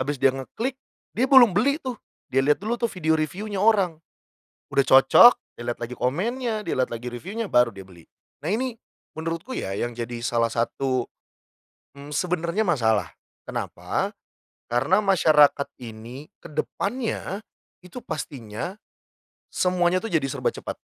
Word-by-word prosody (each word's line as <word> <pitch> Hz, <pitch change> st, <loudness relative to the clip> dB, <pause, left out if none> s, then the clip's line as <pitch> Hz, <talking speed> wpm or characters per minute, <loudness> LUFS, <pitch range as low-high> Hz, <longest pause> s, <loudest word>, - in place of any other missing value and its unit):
habis 145 Hz, +3 st, -1 dB
dia 135 Hz, 0 st, +3 dB
ngeklik 225 Hz, -, -4 dB, 0.4 s
dia 255 Hz, +4 st, +1 dB
belum 245 Hz, -7 st, +8 dB
beli 270 Hz, +9 st, +2 dB
tuh, 260 Hz, -4 st, -3 dB, 0.4 s
dia 135 Hz, -, +4 dB
lihat 145 Hz, +2 st, +3 dB
dulu 220 Hz, +4 st, -1 dB
tuh 235 Hz, -, +1 dB
video 160 Hz, -6 st, 0 dB
review-nya 195 Hz, +6 st, -3 dB
orang, 195 Hz, -7 st, +3 dB, 0.7 s
udah -, -, +4 dB
cocok, 135 Hz, -, +8 dB, 0.3 s
dia -, -, -6 dB
lihat 120 Hz, -, -1 dB
lagi 120 Hz, +1 st, -5 dB
komennya, 220 Hz, -, -1 dB
dia -, -, -3 dB
lihat 130 Hz, 0 st, +1 dB
lagi 120 Hz, +1 st, -5 dB
review-nya, 195 Hz, -, -5 dB
baru 120 Hz, -1 st, +5 dB
dia 95 Hz, -1 st, -10 dB
beli. 85 Hz, -3 st, -16 dB, 0.4 s
Nah, -, -, -2 dB
ini 250 Hz, +1 st, -1 dB, 0.4 s
menurutku 165 Hz, +9 st, -4 dB
ya 95 Hz, +1 st, -3 dB
yang 120 Hz, +3 st, -2 dB
jadi 120 Hz, 0 st, -5 dB
salah 115 Hz, -1 st, +1 dB
satu, 130 Hz, +2 st, 0 dB, 1.0 s
mmm, 145 Hz, +1 st, -10 dB
sebenarnya 180 Hz, +4 st, 0 dB
masalah, 110 Hz, -, +1 dB, 0.3 s
kenapa? -, -, -3 dB, 0.6 s
Karena 135 Hz, -, +3 dB
masyarakat 150 Hz, -7 st, +4 dB
ini, 120 Hz, +4 st, -9 dB, 0.2 s
ke 170 Hz, -, -11 dB
depannya, 205 Hz, -, -3 dB, 0.4 s
itu 210 Hz, +8 st, -9 dB
pastinya 140 Hz, -, -5 dB, 0.7 s
semuanya 180 Hz, +1 st, +1 dB
itu, 225 Hz, -, -4 dB
jadi 135 Hz, -, -2 dB
serba -, -, -1 dB
cepat. -, -, -7 dB
160 Hz, 145 wpm, -24 LUFS, 125-205 Hz, 1.0 s, belum